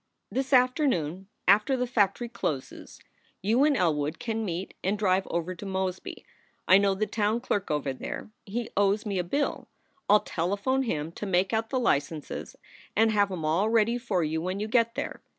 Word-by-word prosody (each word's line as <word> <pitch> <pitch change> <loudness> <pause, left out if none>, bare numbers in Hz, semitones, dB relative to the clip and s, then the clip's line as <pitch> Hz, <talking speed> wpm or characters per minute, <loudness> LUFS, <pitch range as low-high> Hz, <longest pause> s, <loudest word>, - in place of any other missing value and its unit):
"This 265 +1 -2
afternoon, 250 - +2 0.2
after 210 +7 +4
the 250 - 0
factory 235 -1 +1
closes, 150 - -5 0.4
you 230 +7 +3
and 295 -1 +3
Elwood 155 -5 0
can 225 -1 -3
meet 180 -1 -4
and 195 +3 0
drive 190 -2 +1
over 170 +2 -2
to 180 - -10
Mosby. 190 -1 -4 0.4
I 190 - +7
know 200 -1 +2
the 215 +2 0
town 215 +1 0
clerk 205 -6 -2
over 150 -3 -1
there 130 - -6
he 230 +3 -4
owes 205 +2 +2
me 200 -3 -1
a - - 0
bill. 280 +12 -2 0.4
I 205 - +8
ll 210 - +5
telephone 200 +10 -1
him 160 - -2
to 205 - -6
make 190 +2 +1
out 225 0 0
the 260 - 0
licenses 150 - -1 0.4
and 225 +1 +4
have 205 -2 +2
em 170 -4 -4
all 175 +8 +2
ready 230 +1 +2
for 200 -8 0
you 160 +1 -1
when 185 +3 -3
you 210 - -2
get 230 +1 +2
there. - - -4
200 Hz, 185 wpm, -27 LUFS, 180-230 Hz, 0.4 s, I